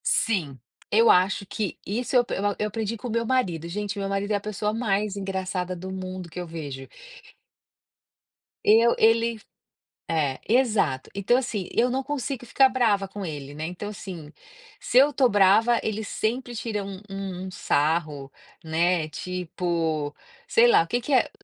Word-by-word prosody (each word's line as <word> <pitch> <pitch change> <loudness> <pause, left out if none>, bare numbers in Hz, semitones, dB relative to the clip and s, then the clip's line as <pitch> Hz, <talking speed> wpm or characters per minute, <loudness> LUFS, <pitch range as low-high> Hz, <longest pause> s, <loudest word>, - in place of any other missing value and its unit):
Sim. 160 - 0 0.3
Eu 225 +2 +6
acho 190 +2 +4
que 200 0 -3
isso 240 +6 -2
eu 245 - +4
eu 205 +1 -1
eu 210 - 0
aprendi 220 +1 -3
com 245 - -6
o - - -4
meu 230 +1 0
marido, 190 -11 0
gente 205 +2 -4
meu 195 -1 -2
marido 200 +1 -2
é - - +3
a 200 - -1
pessoa 210 0 -2
mais 210 -3 0
engraçada 190 -2 -3
do 185 +2 -7
mundo 185 -1 -6
que 165 - -7
eu 180 - -4
vejo. 145 -5 -7 1.8
Eu 230 +2 +5
ele 230 0 +3 0.7
é, 150 -5 0
exato, 215 - +2
então 200 +5 +2
assim, 220 -8 -3
eu 245 +2 +2
não 265 +2 -1
consigo 270 -3 -4
ficar 265 +3 +5
brava 225 -6 +1
com 195 0 -6
ele, 145 -3 -6
né, 155 +2 -5
então 180 +4 -6
assim, 180 -7 -8 0.5
se 245 - 0
eu 280 +3 +7
estou 265 -3 +3
brava, 210 +3 +4
ele 220 0 -2
sempre 240 +4 -2
tira 220 -3 -3
um 195 -1 -7
um 190 -1 -5
sarro, 150 -4 0 0.3
né, 165 +1 +1
tipo, 165 -3 -2 0.3
sei 475 +1 +5
lá, 425 -3 +6
o - - -11
que 245 - 0
que 280 +4 -3
é 255 - +4
200 Hz, 170 wpm, -25 LUFS, 175-230 Hz, 1.8 s, eu